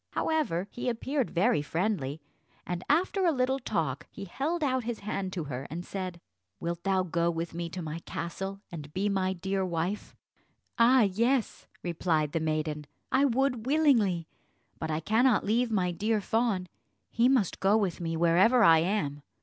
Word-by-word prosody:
However, 270 - 0
he 245 - -3
appeared 260 +3 -1
very 190 -1 +2
friendly, 160 -3 -2 0.5
and 175 0 -4
after 365 +6 +2
a 345 - +4
little 265 -1 +1
talk 255 - -2
he 200 - -8
held 305 - -2
out 260 -3 +1
his 235 0 -4
hand 195 -2 -3
to 170 - -3
her, 135 -2 -5
and 175 +3 -5
said, 185 -3 -5 0.4
"Wilt 170 0 -3
thou 190 0 +1
go 170 -1 0
with 165 0 -3
me 170 0 -4
to 180 +1 -6
my 155 +1 -5
castle 195 +4 -5
and 150 -4 -8
be 200 +2 +1
my 190 -1 0
dear 190 +1 -2
wife?" 180 +3 -3 0.6
"Ah 245 +2 +6
yes," 230 +5 0 0.2
replied 160 -3 0
the 165 - 0
maiden, 155 -1 -2 0.2
"I 270 +2 +4
would 255 -2 0
willingly; 235 - +3 0.5
but 160 - -3
I 155 0 -1
cannot 225 +6 +3
leave 235 +4 +2
my 185 -5 +1
dear 210 +5 0
fawn: 215 -3 0 0.5
he 235 +2 +3
must 245 -9 +1
go 200 +3 +4
with 190 -5 -1
me 165 -1 -2
wherever 185 +9 +5
I 165 -4 +7
am." 160 -5 -1
195 Hz, 170 wpm, -29 LUFS, 170-235 Hz, 0.6 s, I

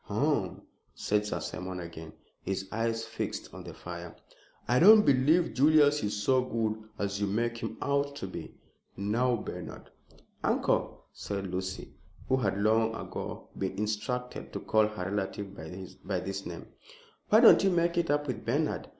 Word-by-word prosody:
"Hum," - - 0 0.3
said 105 0 0
Sir - - -2
Simon 90 0 -5
again, 80 -2 -8 0.3
his 95 0 -3
eyes 115 0 -1
fixed 110 0 -5
on - - -9
the - - -9
fire. - - -8 0.5
"I 125 +2 +3
don't 210 +4 +9
believe 140 +2 +4
Julius 150 +2 +5
is 105 0 -1
so 130 +2 +3
good 110 -2 -2
as 100 0 -2
you 100 - +1
make 115 +3 -1
him - - -5
out 140 0 0
to 140 - -5
be. 95 - -8 0.4
Now 115 +6 +1
Bernard 115 - -7 0.3
" - - -33
"Uncle," - - 0
said 100 -1 -4
Lucy, 95 0 -4 0.3
who 130 - +3
had 100 -6 0
long 110 +2 +2
ago - - -6
been 95 -1 -3
instructed 115 +4 -3
to - - -3
call 110 -1 +3
her 105 -4 -5
relative 100 0 -3 0.5
by 95 -2 -1
this 95 +2 -5
name, - - -7 0.6
"why 215 - +7
don't 235 - +8
you 195 - +5
make 170 -1 +2
it 170 -1 +1
up 145 0 +2
with 125 -6 -4
Bernard? 145 +6 -1
110 Hz, 165 wpm, -30 LUFS, 100-140 Hz, 0.6 s, don't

